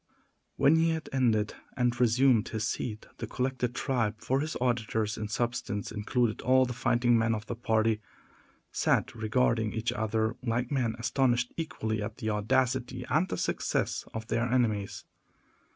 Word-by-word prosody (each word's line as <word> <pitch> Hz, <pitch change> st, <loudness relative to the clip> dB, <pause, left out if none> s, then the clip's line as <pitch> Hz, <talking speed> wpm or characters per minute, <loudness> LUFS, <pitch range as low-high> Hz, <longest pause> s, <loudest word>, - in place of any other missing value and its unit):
When 140 Hz, +4 st, +5 dB
he 165 Hz, +1 st, +3 dB
had 160 Hz, -1 st, -3 dB
ended, 115 Hz, -5 st, +2 dB, 0.2 s
and 120 Hz, -1 st, +1 dB
resumed 125 Hz, -1 st, +4 dB
his 110 Hz, 0 st, -2 dB
seat, 110 Hz, -2 st, -4 dB
the -, -, -5 dB
collected 125 Hz, -1 st, -2 dB
tribe—for 125 Hz, -1 st, 0 dB
his 155 Hz, +2 st, -2 dB
auditors, 110 Hz, -3 st, 0 dB
in 110 Hz, -, -4 dB
substance, 115 Hz, -2 st, -2 dB
included 110 Hz, +1 st, 0 dB
all 130 Hz, +1 st, +4 dB
the 125 Hz, -, -4 dB
fighting 120 Hz, 0 st, +2 dB
men 115 Hz, 0 st, +2 dB
of 105 Hz, 0 st, -6 dB
the 120 Hz, -, -4 dB
party—sat 110 Hz, -2 st, -1 dB
regarding 110 Hz, -1 st, +1 dB
each 115 Hz, +1 st, -1 dB
other 110 Hz, +1 st, 0 dB
like 120 Hz, +1 st, -1 dB
men 125 Hz, -5 st, 0 dB
astonished 125 Hz, 0 st, +1 dB
equally 110 Hz, -9 st, -3 dB
at 105 Hz, -, -5 dB
the 110 Hz, -4 st, -2 dB
audacity 125 Hz, +4 st, 0 dB
and 165 Hz, +5 st, +2 dB
the -, -, -2 dB
success -, -, -1 dB
of 110 Hz, 0 st, -5 dB
their 120 Hz, +1 st, -1 dB
enemies. 110 Hz, -6 st, 0 dB
120 Hz, 150 wpm, -29 LUFS, 110-130 Hz, 0.2 s, When